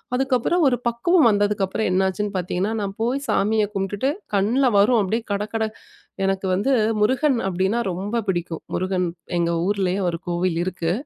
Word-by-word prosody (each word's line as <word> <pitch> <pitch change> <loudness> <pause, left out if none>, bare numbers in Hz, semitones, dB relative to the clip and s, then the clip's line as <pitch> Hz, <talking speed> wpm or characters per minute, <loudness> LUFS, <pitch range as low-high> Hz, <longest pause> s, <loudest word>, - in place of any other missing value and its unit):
அதுக்கப்புறம், 265 +6 +1
ஒரு 245 - +2
பக்குவம் 310 +8 +3
வந்ததுக்கப்புறம் 205 -1 +1
என்னாச்சுன்னு 190 +2 0
பாத்தீங்கன்னா, 185 +3 -1
நான் 200 -1 -2
போய் 245 +4 0
சாமிய 215 +2 +2
கும்பிட்டுட்டு 200 +6 -1 0.2
கண்ணுல 220 +7 +2
வரும், 215 +4 +5
அப்பிடியே 220 +4 -1
கடகட 210 +2 -1 0.6
எனக்கு 195 0 -1
வந்து 205 +9 +1 0.3
முருகன். 260 +4 +2
அப்பிடீன்னா 190 +5 0
ரொம்ப 200 +6 -2
பிடிக்கும். 175 -3 -2
முருகன் 185 0 0 0.3
எங்க 170 0 +1
ஊர்லயே 195 -1 0
ஒரு 170 -1 -1
கோவில் 175 0 0
இருக்கு. 175 -2 -2
200 Hz, 140 wpm, -22 LUFS, 185-230 Hz, 0.6 s, வரும்